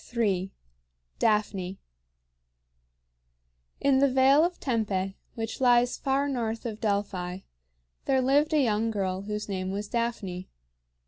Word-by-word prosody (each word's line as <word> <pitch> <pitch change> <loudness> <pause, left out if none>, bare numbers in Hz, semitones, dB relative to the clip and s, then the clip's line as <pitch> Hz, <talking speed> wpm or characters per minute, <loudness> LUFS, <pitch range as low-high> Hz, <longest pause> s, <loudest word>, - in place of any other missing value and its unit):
III. 195 -4 +1 0.7
DAPHNE. 200 -4 0 2.0
In 275 -1 +3
the 280 0 +4
Vale 265 +3 +5
of 350 +1 -1
Tempe, 200 -6 -1 0.2
which 225 +2 -5
lies 245 -1 +4
far 275 +1 +1
north 230 -4 -2
of 220 -2 -5
Delphi, 195 -3 -2 0.6
there 265 -1 +3
lived 285 +4 +3
a 310 - +3
young 225 -1 +1
girl 190 -3 -2
whose 210 +1 -4
name 185 -2 -3
was 200 +2 -3
Daphne. 225 -6 -3
220 Hz, 120 wpm, -27 LUFS, 195-260 Hz, 2.0 s, Vale